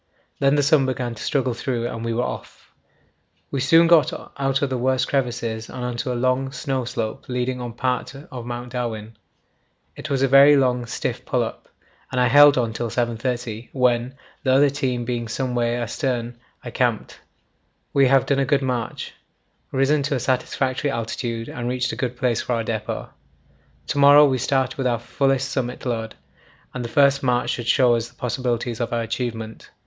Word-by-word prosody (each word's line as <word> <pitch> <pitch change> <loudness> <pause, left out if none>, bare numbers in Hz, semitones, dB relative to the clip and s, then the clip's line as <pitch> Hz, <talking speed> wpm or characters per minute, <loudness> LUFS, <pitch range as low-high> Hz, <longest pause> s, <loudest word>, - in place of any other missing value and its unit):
Then 140 +1 +3
the 145 - +2
sun 140 -1 +4
began 125 -2 -2
to 115 - -10
struggle 130 -3 0
through 120 0 -2
and 115 -1 -5
we 115 - -2
were 120 +2 0
off. - - -7 0.8
We 140 - -1
soon 165 +6 +5
got 165 -2 +5 0.2
out 135 0 0
of 140 - +1
the 130 - 0
worst 130 +1 +1
crevasses 120 -4 -2
and 125 - -5
on 125 -1 -3
to 125 +1 -2
a - - -2
long 130 +2 0
snow 130 -1 -2
slope 110 -1 -4
leading 125 0 -2
on 120 -1 -5
part 125 +2 -2
of 130 -4 -9
Mount 120 0 -6
Darwin. 115 -3 -4 0.8
It - - -7
was 135 -1 +1
a - - +4
very 140 +2 +7
long 125 -3 +1
stiff - - -3
pull - - 0
up, - - -8 0.4
and 125 - -1
I 125 -1 +3
held 145 +1 +7
on 115 -3 0
till 115 +1 -3
7.30, 120 -1 -3
when, 125 -1 +1 0.3
the 130 - +1
other 140 +1 +5
team 130 -4 -2
being 120 -1 -3
some 125 +2 -2
way 120 -1 0
astern, 120 0 -3 0.2
I - - -7
camped. - - -1 0.7
We 135 -1 +5
have 135 0 +4
done 140 -1 +1
a - - +3
good 140 0 +1
march, 125 -3 -3 0.6
risen 135 +2 +2
to 140 +1 -1
a - - -1
satisfactory 130 +2 -1
altitude, 115 -1 -3
and 120 0 -4
reached 125 0 -1
a - - -5
good 125 -2 -3
place 120 -3 0
for 125 - -2
our 115 -1 0
depot. 110 - -4 0.8
To - - -1
morrow 145 +1 +8
we 130 -2 0
start 130 +1 0
with 130 - +1
our 120 -1 +1
fullest 135 +3 0
summit 125 -2 -3
load, 115 -3 -3 0.6
and 125 - -4
the 115 - -5
first 140 +2 +4
march 125 -2 +1
should 120 -1 -4
show 120 0 +4
us 115 0 -1
the - - -25
possibilities 120 -1 -2
of 120 - -2
our 115 -1 0
achievement. 115 -1 -5
125 Hz, 195 wpm, -22 LUFS, 120-135 Hz, 0.8 s, morrow